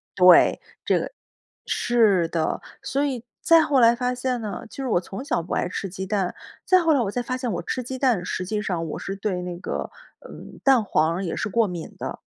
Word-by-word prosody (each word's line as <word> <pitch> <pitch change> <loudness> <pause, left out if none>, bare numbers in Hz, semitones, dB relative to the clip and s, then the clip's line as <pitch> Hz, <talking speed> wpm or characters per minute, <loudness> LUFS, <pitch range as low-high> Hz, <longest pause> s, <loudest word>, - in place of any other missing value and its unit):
对， 180 -1 +6 0.3
这 - - +3
个 - - -5 0.5
是 210 -8 +2
的。 165 -1 -1 0.2
所 280 +2 -1
以 255 -4 -3 0.2
再 330 -1 +6
后 280 -4 +2
来 230 0 +6
发 250 0 -1
现 250 -1 -2
呢， 210 -2 -5
其 - - -14
实 270 -1 -3
我 175 - +2
从 195 +8 -7
小 280 - -1
不 180 - -5
爱 - - 0
吃 185 +1 -4
鸡 190 +1 -5
蛋。 195 -2 -1 0.3
再 370 -1 +5
后 325 -2 +3
来 275 - +3
我 200 -3 -1
才 245 - -2
发 255 +1 -3
现 250 -3 -3
我 175 - -2
吃 250 +8 -3
鸡 260 +2 -5
蛋， 240 -9 +2
实 185 - -3
际 210 +2 -2
上 170 -5 -2
我 - - -5
是 195 - -5
对 195 -3 -2
那 180 -1 -5
个， - - -4 0.4
嗯， - - -11
蛋 265 -5 +5
黄 160 -4 +1
儿 190 +3 -3
也 170 - -3
是 220 - -2
过 225 0 +2
敏 175 -3 -6
的。 - - -5
210 Hz, 250 characters per minute, -24 LUFS, 180-255 Hz, 0.5 s, 对